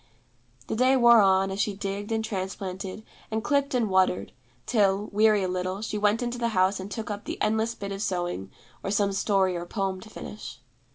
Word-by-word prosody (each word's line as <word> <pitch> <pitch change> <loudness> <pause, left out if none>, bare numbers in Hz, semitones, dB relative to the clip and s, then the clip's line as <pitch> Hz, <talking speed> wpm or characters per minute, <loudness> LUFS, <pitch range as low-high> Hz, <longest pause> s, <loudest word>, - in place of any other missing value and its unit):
The - - -3
day 255 +3 +4
wore 235 -2 +7
on, 190 0 +3
as 195 +1 -1
she 205 - -1
digged 200 +1 -4
and 220 0 0
transplanted 190 -1 -5 0.3
and 220 0 -2
clipped 280 -1 +1
and 235 -3 +2
watered, 190 -1 +2 0.3
till, 205 -2 +2
weary 210 -1 +4
a - - 0
little, 185 +2 -3
she 215 -1 -3
went 210 +3 +2
into 240 0 -3
the 235 - +1
house 190 +2 +3
and 190 +1 -6
took 220 0 -5
up 205 0 -6
the - - -5
endless 220 +2 +1
bit 200 0 -6
of 195 0 -4
sewing, 175 - -2 0.3
or - - -2
some 200 0 +1
story 195 -2 +2
or 175 0 -5
poem 190 -1 -2
to 220 - -12
finish. 210 - -8
200 Hz, 205 wpm, -27 LUFS, 190-220 Hz, 0.3 s, wore